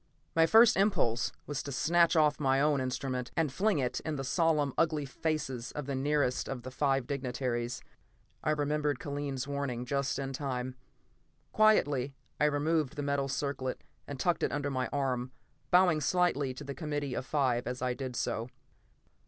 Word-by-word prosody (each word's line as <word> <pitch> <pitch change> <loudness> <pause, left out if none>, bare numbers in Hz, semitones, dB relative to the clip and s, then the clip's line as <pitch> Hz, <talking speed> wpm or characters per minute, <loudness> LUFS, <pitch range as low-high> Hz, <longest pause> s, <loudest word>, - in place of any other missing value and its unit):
My 165 0 +5
first 225 +1 +7
impulse 190 - +2
was 145 -2 -3
to 140 - -6
snatch 170 +5 +3
off 150 -2 +3
my 135 -2 +2
own 145 -1 +2
instrument 130 -1 -3
and 155 -5 +1
fling 205 +2 +2
it 125 -3 -1
in 155 - -3
the 135 - -3
solemn, 150 -1 +1
ugly 155 -3 +1
faces 135 -4 -3
of 150 - -4
the 140 - -3
nearest 140 -1 0
of 125 -3 -5
the 130 - -7
five 135 -1 +1
dignataries; 125 -3 -3 0.6
I - - 0
remembered 150 -2 0
Kellen's 140 -2 -4
warning 140 -4 -3
just 140 +1 -1
in 135 -1 -3
time. 130 -2 -3 0.8
Quietly, 145 -11 +3 0.2
I 150 - +4
removed 150 0 +1
the 145 - -3
metal 140 -1 0
circlet 135 -1 -3 0.2
and 140 -2 -6
tucked 175 +3 +1
it - - +1
under 145 -1 -2
my 130 -1 -1
arm, 130 -3 -1 0.4
bowing 180 -4 +5
slightly 150 -5 +1
to 145 - -8
the 140 0 -5
committee 145 -3 -3
of - - -2
five 130 -4 0
as 125 0 -3
I 125 -1 +1
did 130 -1 -5
so. 115 0 -2
140 Hz, 170 wpm, -31 LUFS, 130-150 Hz, 0.8 s, first